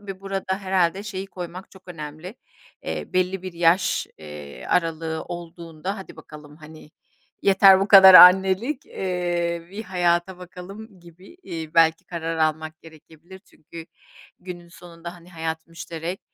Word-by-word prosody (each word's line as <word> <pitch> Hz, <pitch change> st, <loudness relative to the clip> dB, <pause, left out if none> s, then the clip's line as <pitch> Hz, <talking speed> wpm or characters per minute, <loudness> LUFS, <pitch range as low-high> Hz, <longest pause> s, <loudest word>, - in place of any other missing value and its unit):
Ve 195 Hz, -2 st, -9 dB
burada 195 Hz, -1 st, -3 dB
herhâlde 190 Hz, -1 st, 0 dB
şeyi 195 Hz, -2 st, -6 dB
koymak 180 Hz, -1 st, -9 dB
çok 190 Hz, -1 st, -19 dB
önemli. 155 Hz, +4 st, -9 dB, 0.5 s
Eee, -, -, -6 dB
belli 185 Hz, +1 st, -1 dB
bir 185 Hz, -, -7 dB
yaş 170 Hz, +2 st, +1 dB
eee, 75 Hz, -2 st, -10 dB
aralığı 165 Hz, -2 st, -1 dB
olduğunda: 170 Hz, +2 st, -7 dB
"Hadi 190 Hz, -, -11 dB
bakalım, 150 Hz, -1 st, -14 dB
hani, 155 Hz, -1 st, -14 dB, 0.5 s
yeter 195 Hz, -1 st, +6 dB
bu 195 Hz, -, -1 dB
kadar 190 Hz, -2 st, +9 dB
annelik, 190 Hz, -, +6 dB
eee, 175 Hz, -2 st, -3 dB
bir 210 Hz, +3 st, -7 dB
hayata 175 Hz, 0 st, 0 dB
bakalım." 185 Hz, +3 st, -12 dB
gibi, 175 Hz, -, -17 dB
iii, 160 Hz, -, -7 dB
belki 165 Hz, 0 st, +3 dB
karar 165 Hz, -1 st, -5 dB
almak 155 Hz, 0 st, -2 dB
gerekebilir. 165 Hz, +3 st, -16 dB
Çünkü 165 Hz, -3 st, -14 dB, 0.5 s
günün 175 Hz, -1 st, -10 dB
sonunda, 170 Hz, 0 st, -11 dB
hani, 175 Hz, 0 st, -17 dB
hayat 160 Hz, -1 st, -5 dB
müşterek, 165 Hz, +2 st, -7 dB
175 Hz, 135 wpm, -23 LUFS, 165-190 Hz, 0.5 s, kadar